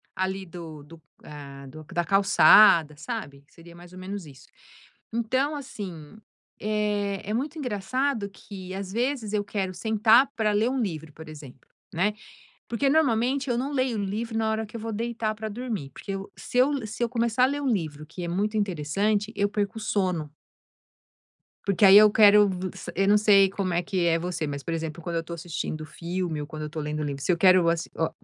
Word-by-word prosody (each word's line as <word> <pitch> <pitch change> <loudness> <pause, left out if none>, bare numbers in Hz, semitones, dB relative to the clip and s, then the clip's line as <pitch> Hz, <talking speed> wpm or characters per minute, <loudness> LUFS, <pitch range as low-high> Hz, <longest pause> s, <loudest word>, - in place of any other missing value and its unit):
ali 190 0 -2
do 165 -4 -9
do, 160 +2 -15 0.2
ah, 140 -2 -10
do 155 +4 -11
da 175 - +1
calçada, 195 -4 +6
sabe? 145 - -6
Seria 170 0 -15
mais 175 0 -14
ou 185 - -10
menos 190 0 -6
isso. 140 -2 -15 0.7
Então 260 +6 0
assim, 200 - -8 0.4
é 210 -2 -1
é - - -1
muito 285 +7 -3
engraçado 250 0 -1
que 190 -2 -10
às 195 -1 -5
vezes 240 0 -1
eu 210 -1 +1
quero 200 -2 -3
sentar 220 +6 +4
pra 220 -3 +1
ler 215 +4 +2
um 265 +1 -1
livro 160 -7 -4
por 160 +1 -11
exemplo 145 -4 -13 0.2
né, 190 +5 +1 0.5
porque 240 +4 0
normalmente 270 -2 +2
eu 240 - +1
não 265 +4 -2
leio 255 -4 0
um - - -1
livro 225 +4 -3
na 220 -1 +1
hora 220 0 -2
que 215 - -15
eu - - -4
vou 225 0 -4
deitar 230 0 -2
pra 215 +1 -5
dormir, 215 - -5
porque 200 - -7
eu 195 0 -6
se - - -5
eu 270 -2 +2
se 220 +3 -4
eu 235 - 0
começar 235 0 +1
a - - +6
ler 285 +2 -2
um - - -1
livro 155 -9 -2
que 170 +3 -8
é - - -3
muito 205 +5 -1
interessante 200 +3 0
eu 205 0 +1
perco 205 +2 -2
o - - -8
sono. 185 -8 -1 1.3
Porque 200 0 +3
aí 195 +1 +9
eu 210 0 +8
quero 210 -1 +7
v 185 -1 -4
sa - - -7
eu 195 +1 +2
não 205 +1 +6
sei 200 -2 +5
como 190 -2 -2
é 170 - +1
que 180 0 -1
é 165 -1 +3
você, 175 -2 -3
mas, 140 -1 -5
por 165 - -3
exemplo, 165 0 -4
quando 170 0 -4
eu - - 0
estou 165 +1 -8
assistindo 155 -2 -5
filme 170 -1 -4
ou 145 - -6
quando 155 0 -7
eu - - -3
estou 155 +1 -5
lendo 150 0 -3
livro 140 -2 -4
se - - +2
eu 175 - +1
quero 185 -1 +5
assi 170 0 -1
oh, 160 - +1
200 Hz, 210 wpm, -26 LUFS, 170-220 Hz, 1.3 s, aí